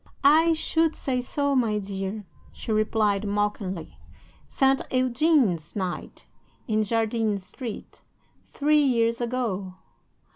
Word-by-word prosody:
"'"I 320 +4 +6
should 320 0 +1
say 255 -2 -1
so, 285 +2 -1
my 225 -5 +2
dear," 195 +1 -4 0.3
she - - -6
replied, 215 -1 +1
mockingly. 200 -4 -3 0.5
"Saint 270 0 +2
Eugene's 255 - +2
night, 185 -3 -5 0.4
in 215 -1 +1
Jardines 220 -2 0
Street, 230 +2 -8 0.5
three 300 +1 +3
years 235 -4 +1
ago." 225 -7 -2
225 Hz, 105 wpm, -25 LUFS, 205-265 Hz, 0.5 s, I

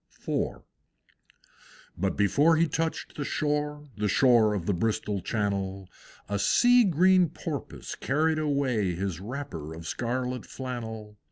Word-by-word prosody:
IV. - - -1 1.3
But 95 +2 -1
before 145 +11 +4
he 165 +1 +3
touched 160 +2 -3
the 145 - -2
shore, 150 0 -1
The 105 0 0
shore 110 -1 +4
of 90 -5 -3
the 100 - +1
Bristol 105 +1 -1
Channel, 100 -3 -2 0.4
A 100 +1 -2
sea 245 - +5
green 185 0 +4
Porpoise 150 -3 -6
carried 155 +3 0
away 130 - 0
His 95 -2 -3
wrapper 95 - -6
of 80 0 -9
scarlet 125 +5 -3
flannel. 110 -5 -6
125 Hz, 125 wpm, -27 LUFS, 100-150 Hz, 1.3 s, sea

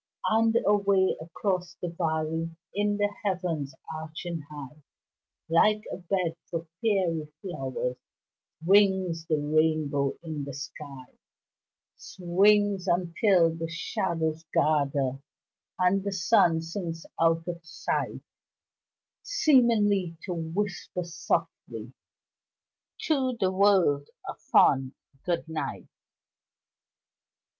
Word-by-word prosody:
And 225 +1 +3
away 200 -2 +3
across 180 +2 -2
the 175 - -3
valley 160 -1 -1 0.2
In 205 0 0
the 205 0 0
heavens 175 -7 -2 0.2
arching 160 +1 -5
high, 150 0 -10 0.7
Like 210 +6 +3
a - - -4
bed 180 -2 -1
for 165 -1 -3 0.2
fairy 175 -8 0
flowers 130 -8 -4 0.7
Swings 190 -3 +3
the 155 - +2
rainbow 150 -2 +1
in 155 -3 -4
the 140 -1 -6
sky 140 -2 -8 0.9
Swings 195 +2 +2
until 175 0 +3
the 165 0 -4
shadows 170 -4 -2
gather 140 -3 +1 0.6
And 185 +1 +2
the 200 -1 -2
sun 170 -2 +3
sinks 165 -1 -5 0.2
out 165 0 +2
of 170 -1 -5
sight, 165 - -3 1.0
Seemingly 225 - +3
to 180 - -3
whisper 175 +2 -3
softly 170 0 -3 1.1
To 260 -5 +1
the 185 -1 +2
world 185 -8 +3 0.2
a - - -3
fond 135 0 +3 0.3
good 170 -2 -1
night. 160 -1 -4
170 Hz, 100 wpm, -27 LUFS, 155-195 Hz, 1.1 s, And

